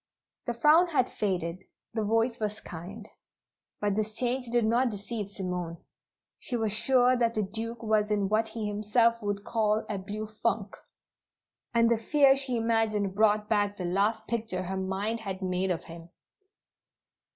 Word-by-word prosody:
The 240 - -1
frown 305 +9 +5
had 285 -7 +1
faded; 185 -3 -2 0.3
the 220 -1 -1
voice 225 +3 +1
was 210 -1 -2
kind. 195 +6 -9 0.7
But 205 -1 0
this 215 0 -1
change 250 +2 -1
did 240 -1 +2
not 240 +3 +3
deceive 205 0 -5
Simone. 180 -4 -4 0.6
She 260 - -4
was 220 -3 -1
sure 250 +3 +4
that 235 -2 +1
the 215 - +1
Duke 225 +3 -5
was 215 -1 +2
in 205 -2 +1
what 215 +2 +1
he 220 -1 -5
himself 230 +3 +2
would 205 -1 -2
call 215 -1 +1
a 205 -2 -3
"blue 210 +3 -5
funk," 215 -1 -2 1.0
and 230 -1 +4
the 230 -1 +2
fear 275 +3 +5
she 270 -3 0
imagined 225 -3 +1
brought 210 0 +3
back 205 -1 +1
the 180 - -4
last 205 +5 +1
picture 220 -6 -2
her 190 +1 -4
mind 190 +4 -2
had 195 -3 -5
made 185 +1 0
of 175 -3 -1
him. 165 0 -11
215 Hz, 165 wpm, -29 LUFS, 200-230 Hz, 1.0 s, frown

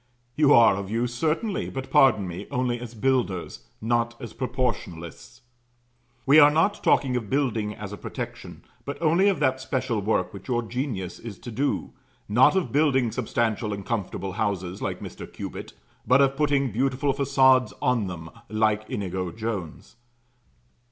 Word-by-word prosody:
You 150 -2 +4
are 115 -7 +6
of 100 -1 -5
use 120 +2 -1
certainly; 165 - -1
but, 135 0 -6
pardon 110 -8 +5
me, 85 0 -7
only 125 -1 -1
as 120 -1 -8
builders 105 - -1
not 115 +1 0
as 120 - -8
proportionalists. 120 -5 -4 0.8
We 145 +3 +7
are 145 -1 +9
not 165 +7 +1
talking 130 -2 +3
of 115 -5 -3
building 115 -7 0
as 105 -1 -7
a - - -6
protection, - - -7 0.2
but 140 - -6
only 170 +5 +3
of 190 -7 0
that 130 -2 +1
special 125 -4 -1
work 105 +3 0
which - - -10
your 120 -2 0
genius 115 -6 -4
is 110 -5 -8
to 120 - -9
do; 135 +6 -1 0.4
not 120 - +5
of 190 - 0
building 135 -5 +2
substantial 110 -3 -1
and 100 -1 -6
comfortable 100 -3 -3
houses 95 -3 -2
like - - -3
Mr. - - -9
Cubitt, - - -7 0.3
but 130 +3 +5
of 135 -1 +3
putting 140 -3 +1
beautiful 135 +4 0
façades 130 -2 +4
on 120 -5 +1
them 80 -2 -7 0.2
like 110 0 0
Inigo 95 -2 -3
Jones. 105 -3 -6
120 Hz, 160 wpm, -25 LUFS, 105-135 Hz, 0.8 s, are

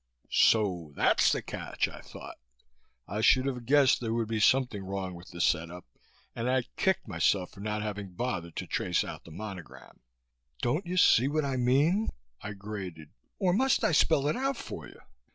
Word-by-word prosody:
So 90 -9 +3
that's - - +4
the - - -1
catch, - - -2
I - - -10
thought. - - -11 0.7
I 105 - -3
should 130 +3 +5
have 125 -4 -4
guessed 140 -1 +5
there 115 -1 -2
would 115 -2 -1
be 110 -1 -1
something 120 -3 +2
wrong 95 -1 -4
with 85 +1 -12
the 85 - -10
set 85 -1 +1
up 90 +1 -10 0.5
and 115 +2 -2
I 130 -1 +2
kicked 190 -8 +1
myself 90 0 +1
for - - -15
not 105 +1 -3
having 100 -3 -5
bothered 90 -8 -3
to - - -4
trace 90 -2 0
out - - -8
the 85 - -12
monogram. 95 -1 -9 0.6
"Don't 155 +10 0
you 180 +1 -3
see 130 -7 +5
what 150 +1 0
I 135 -1 -1
mean," 140 - +2 0.3
I 105 0 -6
grated, 95 -6 -8 0.3
"or 180 -2 +2
must 260 +6 +2
I - - +3
spell 145 -2 +3
it 150 - +1
out 270 0 -1
for - - -7
you? - - -16
110 Hz, 190 wpm, -29 LUFS, 95-135 Hz, 0.7 s, should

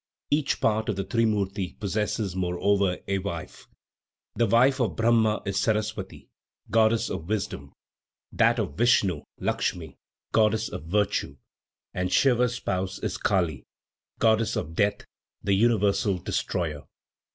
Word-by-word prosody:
Each 145 -1 +1
part 110 0 +1
of 105 - 0
the 95 - -2
trimurti 100 -3 -1
possesses, 105 -1 -2
moreover, 95 +1 +1
a 100 0 0
wife. 90 -4 -6 0.7
The 115 - +2
wife 130 +6 +4
of 120 - 0
Brahma 115 -2 +2
is 95 -1 -2
Sarasvati, 105 -3 -2 0.4
goddess 110 0 +3
of 90 -1 -5
wisdom; 95 -10 -3 0.6
that 115 +1 +3
of 105 -5 -2
Vishnu, 105 - +3 0.2
Lakshmi, 80 -6 -2 0.3
goddess 110 0 +2
of 75 - -7
virtue, 100 -6 0 0.6
and 90 0 -2
Siva's 125 -2 +3
spouse 95 -5 -3
is - - -4
Kali, 85 -9 0 0.5
goddess 110 0 +2
of 80 - -3
death, 105 +4 0 0.4
the 100 - +1
universal 100 -2 +2
destroyer. 85 -3 -2
105 Hz, 125 wpm, -26 LUFS, 95-115 Hz, 0.7 s, wife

